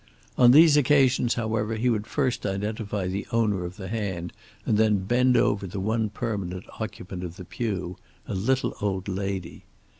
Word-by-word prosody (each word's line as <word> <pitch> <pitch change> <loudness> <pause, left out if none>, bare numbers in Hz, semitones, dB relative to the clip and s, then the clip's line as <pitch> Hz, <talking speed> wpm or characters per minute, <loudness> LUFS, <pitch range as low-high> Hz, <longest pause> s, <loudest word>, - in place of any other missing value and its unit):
On 125 -1 +6
these 150 +3 +7
occasions, 135 -4 +3
however, 110 -1 -1
he 115 +3 0
would 110 -3 0
first 130 0 -1
identify 105 0 -2
the 95 +2 -3
owner 105 -6 +1
of 90 +3 -8
the 95 -3 -7
hand 95 -5 -3 0.3
and 110 - +2
then 105 -3 +2
bend 125 +3 +3
over 100 -1 +1
the 95 +2 -5
one 110 +2 0
permanent 100 -4 -4 0.2
occupant 90 0 -6
of 85 -1 -6
the 90 - -9
pew, 95 -5 -4 0.3
a - - -4
little 125 +8 0
old 95 -2 -2
lady. 95 -2 -4
105 Hz, 170 wpm, -26 LUFS, 95-115 Hz, 0.3 s, these